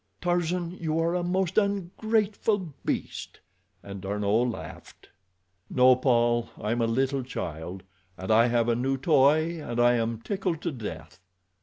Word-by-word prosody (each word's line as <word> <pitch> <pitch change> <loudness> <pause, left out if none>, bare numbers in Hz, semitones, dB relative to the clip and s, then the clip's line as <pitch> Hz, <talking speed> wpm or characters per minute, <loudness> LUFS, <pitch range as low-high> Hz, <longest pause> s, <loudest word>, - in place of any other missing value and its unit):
Tarzan, 175 0 0
you 160 -1 -1
are 165 +1 +1
a 180 - 0
most 185 +2 +1
ungrateful 205 -1 -1
beast!" - - -4 0.4
and 100 -1 -8
D'Arnot 105 +4 +1
laughed. 115 - -9 0.6
"No, 130 0 +5
Paul; 120 -2 +2
I 105 - -2
am 120 +1 0
a 115 - +2
little 135 +4 0
child. 90 -6 -6 0.3
I 110 +5 +3
have 120 -1 +1
a 120 - +2
new 135 +3 0
toy, 155 +3 +3
and 120 -3 -4
I 120 0 +5
am 115 -1 -1
tickled 185 - -2
to - - -1
death." 85 - -8
130 Hz, 145 wpm, -27 LUFS, 115-175 Hz, 0.6 s, No